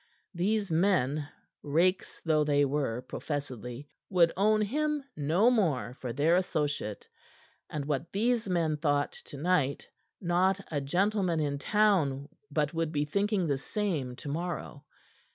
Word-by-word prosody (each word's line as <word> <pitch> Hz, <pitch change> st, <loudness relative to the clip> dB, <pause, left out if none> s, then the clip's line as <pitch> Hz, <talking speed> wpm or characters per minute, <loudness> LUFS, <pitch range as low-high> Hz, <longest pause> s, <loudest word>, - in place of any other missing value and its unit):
These 200 Hz, +2 st, 0 dB
men 155 Hz, -5 st, +2 dB, 0.3 s
rakes 170 Hz, +6 st, +1 dB
though 155 Hz, -2 st, +3 dB
they 145 Hz, -1 st, +3 dB
were, 135 Hz, -4 st, -1 dB
professedly 130 Hz, -2 st, -5 dB, 0.2 s
would 170 Hz, -3 st, +4 dB
own 215 Hz, +2 st, +3 dB
him 300 Hz, +6 st, -1 dB
no 170 Hz, -, +3 dB
more 160 Hz, -, +1 dB
for 125 Hz, -, -3 dB
their 155 Hz, +7 st, +3 dB
associate; 145 Hz, -, -2 dB, 0.6 s
and 150 Hz, -2 st, -4 dB
what 145 Hz, +2 st, -2 dB
these 225 Hz, +1 st, +1 dB
men 165 Hz, -4 st, +1 dB
thought 145 Hz, -2 st, +1 dB
to 145 Hz, -, -11 dB
night 150 Hz, -3 st, +1 dB, 0.3 s
not 185 Hz, +2 st, +2 dB
a 145 Hz, -2 st, 0 dB
gentleman 180 Hz, +3 st, +1 dB
in 145 Hz, -2 st, -1 dB
town 155 Hz, -8 st, +2 dB, 0.2 s
but 150 Hz, -1 st, 0 dB
would 165 Hz, -1 st, -1 dB
be 150 Hz, -2 st, 0 dB
thinking 200 Hz, +3 st, 0 dB
the 140 Hz, -4 st, 0 dB
same 150 Hz, -8 st, -2 dB
tomorrow. 155 Hz, 0 st, -5 dB
160 Hz, 135 wpm, -30 LUFS, 145-190 Hz, 0.6 s, would